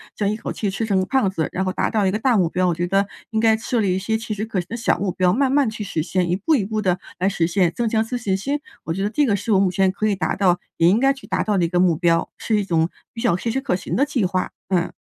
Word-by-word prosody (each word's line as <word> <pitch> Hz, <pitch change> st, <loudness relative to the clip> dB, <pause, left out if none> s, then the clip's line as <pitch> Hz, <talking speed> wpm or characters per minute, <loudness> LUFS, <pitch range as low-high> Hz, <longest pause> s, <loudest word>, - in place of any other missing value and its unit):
将 205 Hz, -1 st, 0 dB
一 210 Hz, -, -1 dB
口 215 Hz, -, -5 dB
气 205 Hz, -, -2 dB
吃 200 Hz, +4 st, -2 dB
成 200 Hz, -3 st, +1 dB
个 185 Hz, -, 0 dB
胖 255 Hz, -1 st, +1 dB
子， 165 Hz, -5 st, -2 dB
然 190 Hz, -, -1 dB
后 185 Hz, -, -1 dB
达 -, -, -1 dB
到 215 Hz, -3 st, +1 dB
一 190 Hz, -, +2 dB
个 210 Hz, -, -1 dB
大 250 Hz, +1 st, +2 dB
目 180 Hz, -5 st, +3 dB
标。 185 Hz, +1 st, +1 dB
我 175 Hz, -, +2 dB
觉 175 Hz, +2 st, -1 dB
得 195 Hz, +1 st, +2 dB, 0.2 s
应 220 Hz, -, -1 dB
该 220 Hz, 0 st, +4 dB
设 230 Hz, +2 st, -2 dB
立 195 Hz, -4 st, +1 dB
一 190 Hz, -, -1 dB
些 220 Hz, +3 st, -1 dB
切 220 Hz, -1 st, -5 dB
实 210 Hz, +1 st, -3 dB
可 215 Hz, -4 st, -2 dB
行 175 Hz, -, -5 dB
的 230 Hz, -, -4 dB
小 230 Hz, -6 st, 0 dB
目 195 Hz, -1 st, -1 dB
标， 180 Hz, 0 st, +2 dB
慢 260 Hz, +6 st, +2 dB
慢 280 Hz, -3 st, +3 dB
去 215 Hz, -, -7 dB
实 165 Hz, -6 st, -2 dB
现， 180 Hz, 0 st, -1 dB
一 175 Hz, -, +2 dB
步 255 Hz, -, +1 dB
一 215 Hz, -8 st, 0 dB
步 215 Hz, +1 st, -2 dB
地 185 Hz, -3 st, +1 dB, 0.2 s
来 185 Hz, +2 st, +2 dB
实 170 Hz, -4 st, 0 dB
现， 180 Hz, -1 st, +2 dB
增 235 Hz, -1 st, -1 dB
强 220 Hz, 0 st, +1 dB
自 245 Hz, +3 st, -4 dB
信 205 Hz, -6 st, -1 dB
心。 275 Hz, +10 st, -2 dB, 0.2 s
我 165 Hz, -, -3 dB
觉 190 Hz, -, -3 dB
得 205 Hz, -, 0 dB
这 290 Hz, +6 st, +2 dB
个 215 Hz, -6 st, +2 dB
是 210 Hz, +3 st, -1 dB
我 190 Hz, -, +5 dB
目 190 Hz, -2 st, +2 dB
前 190 Hz, +1 st, +2 dB
可 215 Hz, +3 st, -1 dB
以 205 Hz, -, +1 dB
达 160 Hz, -4 st, -1 dB
到， 180 Hz, -3 st, +2 dB, 0.2 s
也 165 Hz, -, +4 dB
应 210 Hz, +5 st, +3 dB
该 270 Hz, +1 st, +4 dB
去 275 Hz, -, -14 dB
达 -, -, -1 dB
到 210 Hz, -2 st, 0 dB
的 180 Hz, -, +2 dB
一 -, -, 0 dB
个 175 Hz, 0 st, +1 dB
目 180 Hz, -2 st, +4 dB
标， 165 Hz, 0 st, +1 dB
是 220 Hz, -, 0 dB
一 205 Hz, -, -2 dB
种 165 Hz, -2 st, +1 dB, 0.2 s
比 230 Hz, -, -6 dB
较 170 Hz, -, +2 dB
切 230 Hz, -, -3 dB
实 265 Hz, +4 st, -1 dB
可 265 Hz, -9 st, 0 dB
行 185 Hz, -, -4 dB
的 270 Hz, -, +3 dB
计 270 Hz, -8 st, 0 dB
划， 185 Hz, 0 st, -1 dB, 0.2 s
嗯。 180 Hz, -3 st, +1 dB
200 Hz, 360 characters per minute, -21 LUFS, 180-225 Hz, 0.2 s, 我